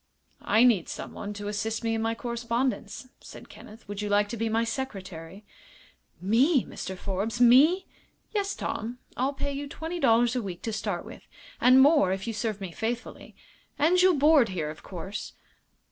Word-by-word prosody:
"I 220 Hz, +3 st, +3 dB
need 225 Hz, -9 st, +3 dB
someone 205 Hz, -, -6 dB
to 205 Hz, 0 st, -6 dB
assist 220 Hz, +2 st, -3 dB
me 225 Hz, 0 st, 0 dB
in 225 Hz, -, -1 dB
my 225 Hz, 0 st, -1 dB
correspondence," 235 Hz, +2 st, -3 dB
said -, -, -12 dB
Kenneth. 220 Hz, +2 st, -14 dB
"Would 205 Hz, 0 st, -5 dB
you 210 Hz, -, -3 dB
like 205 Hz, 0 st, +2 dB
to 235 Hz, -, -4 dB
be 225 Hz, +1 st, -1 dB
my 225 Hz, +1 st, +1 dB
secretary?" 195 Hz, -, -6 dB, 0.7 s
"Me, 245 Hz, -, +3 dB
Mr. 190 Hz, 0 st, -7 dB
Forbes 200 Hz, +5 st, -3 dB
me!" 285 Hz, +10 st, +6 dB, 0.5 s
"Yes, 400 Hz, -2 st, -1 dB
Tom. 230 Hz, +3 st, -4 dB, 0.2 s
I'll 265 Hz, +3 st, 0 dB
pay 280 Hz, +1 st, -3 dB
you 285 Hz, +1 st, -5 dB
twenty 325 Hz, +4 st, -6 dB
dollars 235 Hz, -2 st, +3 dB
a 250 Hz, -, 0 dB
week 185 Hz, -5 st, -7 dB
to 225 Hz, -, -3 dB
start 200 Hz, -4 st, -3 dB
with, -, -, -12 dB, 0.3 s
and 255 Hz, +2 st, +7 dB
more 285 Hz, -, +4 dB
if 190 Hz, 0 st, -3 dB
you 230 Hz, -, -3 dB
serve 215 Hz, -1 st, -3 dB
me 190 Hz, -3 st, -6 dB
faithfully. 230 Hz, +6 st, -5 dB, 0.4 s
And 345 Hz, +5 st, +4 dB
you'll 370 Hz, -1 st, +5 dB
board 290 Hz, -4 st, +5 dB
here, 160 Hz, -5 st, -3 dB
of 155 Hz, -, -12 dB
course." 190 Hz, +2 st, -7 dB
225 Hz, 175 wpm, -27 LUFS, 205-265 Hz, 0.7 s, and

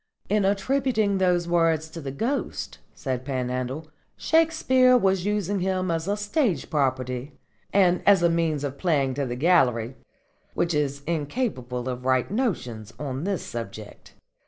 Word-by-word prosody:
"In 205 Hz, -1 st, +2 dB
attributing 210 Hz, 0 st, +1 dB
those 180 Hz, -2 st, +2 dB
words 165 Hz, -2 st, +2 dB
to 165 Hz, -, -7 dB
the 140 Hz, -, -5 dB
Ghost," 235 Hz, -, -3 dB, 0.2 s
said 130 Hz, -2 st, -3 dB
Panhandle, 130 Hz, +2 st, -3 dB, 0.3 s
"Shakespeare 260 Hz, -6 st, +4 dB
was 190 Hz, -4 st, +1 dB
using 205 Hz, -1 st, 0 dB
him 185 Hz, -1 st, 0 dB
as 165 Hz, +1 st, -2 dB
a 205 Hz, +1 st, 0 dB
stage 210 Hz, -, 0 dB
property 130 Hz, -1 st, -1 dB, 0.4 s
and 180 Hz, -3 st, +3 dB
as 195 Hz, -3 st, +6 dB
a -, -, +6 dB
means 165 Hz, -3 st, 0 dB
of 140 Hz, -1 st, -4 dB
playing 145 Hz, -7 st, +1 dB
to 140 Hz, 0 st, -2 dB
the 120 Hz, -, -3 dB
gallery, 130 Hz, -6 st, +2 dB, 0.6 s
which 170 Hz, 0 st, 0 dB
is 140 Hz, -1 st, -1 dB
incapable 145 Hz, -, -2 dB
of 125 Hz, -1 st, -4 dB
right 130 Hz, +2 st, +1 dB
notions 125 Hz, -, -2 dB
on 140 Hz, +1 st, -4 dB
this 195 Hz, -4 st, -2 dB
subject. 110 Hz, -2 st, -8 dB
165 Hz, 145 wpm, -25 LUFS, 130-200 Hz, 0.6 s, as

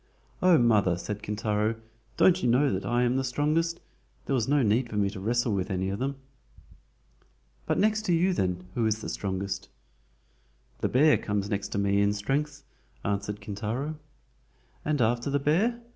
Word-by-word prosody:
"Oh, 180 Hz, -2 st, +6 dB
mother," 105 Hz, -, +3 dB
said 105 Hz, +3 st, -5 dB
Kintaro, 105 Hz, +1 st, -1 dB, 0.4 s
"don't 185 Hz, 0 st, +5 dB
you 120 Hz, -, +1 dB
know 135 Hz, +2 st, +3 dB
that 95 Hz, -, -3 dB
I 120 Hz, +1 st, +2 dB
am 125 Hz, +1 st, +1 dB
the 135 Hz, -, 0 dB
strongest? 155 Hz, +6 st, 0 dB, 0.5 s
There -, -, -1 dB
was 120 Hz, -4 st, +1 dB
no 145 Hz, -1 st, +3 dB
need 115 Hz, +3 st, +2 dB
for 110 Hz, -, -6 dB
me 100 Hz, -1 st, +1 dB
to 100 Hz, -, -7 dB
wrestle 115 Hz, +3 st, 0 dB
with 95 Hz, -2 st, -1 dB
any 95 Hz, 0 st, -1 dB
of 100 Hz, +2 st, -3 dB
them." 135 Hz, +2 st, -2 dB, 1.5 s
"But -, -, +1 dB
next 215 Hz, +1 st, +2 dB
to -, -, +2 dB
you 180 Hz, +3 st, +3 dB
then, 90 Hz, -, -1 dB
who 115 Hz, 0 st, +1 dB
is 110 Hz, 0 st, -1 dB
the -, -, -5 dB
strongest?" 95 Hz, -1 st, -3 dB, 1.1 s
"The -, -, 0 dB
bear 150 Hz, +4 st, +4 dB
comes 105 Hz, 0 st, -2 dB
next 100 Hz, -1 st, -1 dB
to -, -, -2 dB
me 100 Hz, 0 st, +2 dB
in 100 Hz, 0 st, +2 dB
strength," 140 Hz, +7 st, -2 dB, 0.4 s
answered 100 Hz, +1 st, -2 dB
Kintaro. 120 Hz, +9 st, -4 dB, 0.8 s
"And 150 Hz, -3 st, 0 dB
after 120 Hz, +4 st, 0 dB
the 140 Hz, -, +1 dB
bear?" 180 Hz, -, +1 dB
115 Hz, 175 wpm, -27 LUFS, 100-145 Hz, 1.5 s, Oh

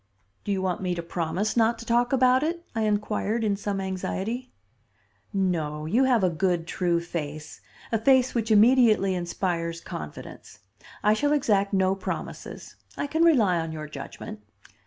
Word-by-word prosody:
"Do 205 Hz, -, -3 dB
you 190 Hz, -1 st, -1 dB
want 185 Hz, -1 st, -1 dB
me 180 Hz, -2 st, -1 dB
to 170 Hz, -, -4 dB
promise 170 Hz, +5 st, -2 dB
not 230 Hz, 0 st, +3 dB
to 230 Hz, -, -9 dB
talk 240 Hz, +1 st, +2 dB
about 255 Hz, -1 st, +4 dB
it?" 340 Hz, +2 st, -2 dB
I 225 Hz, -2 st, 0 dB
inquired 210 Hz, +2 st, 0 dB
in 205 Hz, -2 st, +1 dB
some 200 Hz, 0 st, -3 dB
anxiety. 195 Hz, +6 st, -3 dB, 0.8 s
"No. 160 Hz, -6 st, -1 dB
You 230 Hz, +12 st, +3 dB
have 245 Hz, -6 st, +3 dB
a 185 Hz, -, +4 dB
good, 175 Hz, 0 st, 0 dB
true 175 Hz, -1 st, 0 dB
face; 155 Hz, -3 st, -6 dB, 0.3 s
a 225 Hz, -, +1 dB
face 260 Hz, +2 st, +4 dB
which 230 Hz, -2 st, -1 dB
immediately 220 Hz, -3 st, +5 dB
inspires 170 Hz, -1 st, -2 dB
confidence. -, -, -9 dB, 0.4 s
I 210 Hz, -, +5 dB
shall 290 Hz, +6 st, +1 dB
exact 205 Hz, -9 st, +2 dB
no 190 Hz, -1 st, +2 dB
promises. 195 Hz, -, -6 dB, 0.2 s
I -, -, -1 dB
can 320 Hz, +3 st, +1 dB
rely 220 Hz, -, +4 dB
on 165 Hz, 0 st, -3 dB
your 155 Hz, -1 st, -6 dB
judgment." 135 Hz, -7 st, -8 dB
200 Hz, 160 wpm, -26 LUFS, 175-235 Hz, 0.8 s, immediately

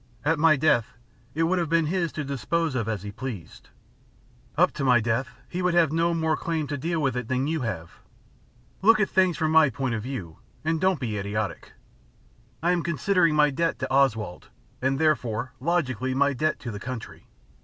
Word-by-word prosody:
"At 160 Hz, 0 st, +2 dB
my 160 Hz, 0 st, +6 dB
death, 125 Hz, -7 st, +1 dB, 0.4 s
it 165 Hz, -, +1 dB
would 180 Hz, +3 st, +2 dB
have 170 Hz, -3 st, -1 dB
been 165 Hz, -1 st, +3 dB
his 170 Hz, 0 st, -1 dB
to 155 Hz, -, -3 dB
dispose 140 Hz, +4 st, -1 dB
of 115 Hz, -4 st, -2 dB
as 105 Hz, -4 st, -3 dB
he 105 Hz, -, -6 dB
pleased. 105 Hz, -7 st, -8 dB, 0.9 s
Up -, -, +4 dB
to -, -, -5 dB
my 125 Hz, -3 st, +5 dB
death, 115 Hz, +3 st, 0 dB, 0.2 s
he 180 Hz, -, -4 dB
would 180 Hz, -1 st, +1 dB
have 170 Hz, -3 st, +5 dB
had -, -, -6 dB
no 165 Hz, +1 st, +2 dB
more 160 Hz, -1 st, +1 dB
claim 160 Hz, -1 st, -2 dB
to 145 Hz, -, -2 dB
deal 170 Hz, +3 st, -1 dB
with 135 Hz, -4 st, 0 dB
it 125 Hz, -2 st, -3 dB
than 130 Hz, +1 st, 0 dB
you 160 Hz, 0 st, -1 dB
have. 90 Hz, -9 st, -5 dB, 0.8 s
Look 215 Hz, +3 st, +6 dB
at 210 Hz, -, +1 dB
things 185 Hz, -3 st, +3 dB
from 155 Hz, -1 st, 0 dB
my 160 Hz, -2 st, +6 dB
point 125 Hz, 0 st, -2 dB
of 110 Hz, -, -2 dB
view, 105 Hz, -10 st, -6 dB, 0.3 s
and 160 Hz, 0 st, 0 dB
don't 185 Hz, -4 st, +2 dB
be 110 Hz, -5 st, -3 dB
idiotic. 100 Hz, +1 st, -4 dB, 0.9 s
I 175 Hz, -, +3 dB
am 175 Hz, -1 st, +1 dB
considering 170 Hz, 0 st, +2 dB
my 150 Hz, -1 st, +4 dB
debt 165 Hz, +4 st, 0 dB
to 130 Hz, -3 st, -3 dB
Oswald, 110 Hz, -9 st, +1 dB, 0.3 s
and 135 Hz, +1 st, +1 dB
therefore, 130 Hz, -6 st, 0 dB
logically, 130 Hz, -5 st, -1 dB
my 140 Hz, +1 st, +3 dB
debt 155 Hz, +3 st, 0 dB
to 120 Hz, -, -5 dB
the 105 Hz, -, -6 dB
country. 125 Hz, 0 st, -7 dB
140 Hz, 200 wpm, -26 LUFS, 120-165 Hz, 0.9 s, my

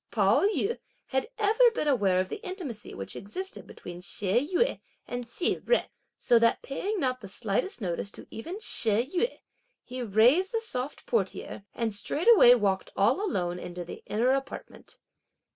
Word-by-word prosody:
Pao 205 Hz, -1 st, +3 dB
yü 430 Hz, +2 st, 0 dB, 0.3 s
had 265 Hz, -, -1 dB
been 425 Hz, -2 st, +1 dB, 0.4 s
ever 300 Hz, -, +1 dB
aware 195 Hz, -8 st, +2 dB
of 185 Hz, -, 0 dB
the 410 Hz, -, -7 dB
intimacy 360 Hz, -, -6 dB
which 95 Hz, -, -6 dB
existed 370 Hz, -, -7 dB
between 175 Hz, 0 st, -9 dB
She 210 Hz, -, -1 dB
Yüeh 470 Hz, +7 st, +2 dB, 0.3 s
and 245 Hz, 0 st, -4 dB
Hsi 340 Hz, -, 0 dB
Jen, -, -, +2 dB, 0.3 s
so 235 Hz, -, +4 dB
that 230 Hz, 0 st, +2 dB
paying 390 Hz, +9 st, -3 dB
not 255 Hz, -4 st, -1 dB
the 200 Hz, -, -8 dB
slightest 225 Hz, -, -2 dB
notice 180 Hz, +1 st, -2 dB
to -, -, -10 dB
even 335 Hz, -, -6 dB
She 230 Hz, -, +1 dB
Yüeh, 370 Hz, -, -1 dB, 0.4 s
he 255 Hz, +1 st, -6 dB
raised 245 Hz, -, +4 dB
the 455 Hz, -, +2 dB
soft 270 Hz, -, -5 dB
portiere 460 Hz, -, -2 dB
and 230 Hz, -3 st, -1 dB
straightway 290 Hz, -, +6 dB
walked 195 Hz, -4 st, 0 dB
all 235 Hz, -, +3 dB
alone 180 Hz, -, -1 dB
into 175 Hz, 0 st, -6 dB
the -, -, -9 dB
inner 235 Hz, +4 st, +2 dB
apartment. 270 Hz, 0 st, -5 dB
245 Hz, 160 wpm, -28 LUFS, -, 0.4 s, straightway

